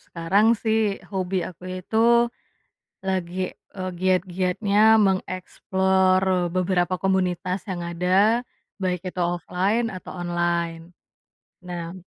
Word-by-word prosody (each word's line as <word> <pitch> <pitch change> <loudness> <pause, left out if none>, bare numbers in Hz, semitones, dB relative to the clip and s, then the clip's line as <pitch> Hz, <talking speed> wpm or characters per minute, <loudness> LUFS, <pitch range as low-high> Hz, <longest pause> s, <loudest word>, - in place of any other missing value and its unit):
sekarang, 180 +6 +1 0.2
sih, 220 -3 +1 0.2
hobi 190 0 -2
aku 180 0 -13 0.2
itu 220 - -5 1.1
lagi, 185 -1 -2 0.4
eee, 185 -1 -3
giat-giatnya 185 +2 0 0.3
meng-explore 185 -1 +1
beberapa 185 0 +1
komunitas 185 -1 0
yang 175 -2 -3
ada. 185 +7 +2 0.4
Baik 180 -2 0
itu 180 - -5
offline 195 +6 0
atau 185 - -9
online. 170 -1 -1 0.8
Nah 175 -1 -6
185 Hz, 95 wpm, -24 LUFS, 175-190 Hz, 1.1 s, ada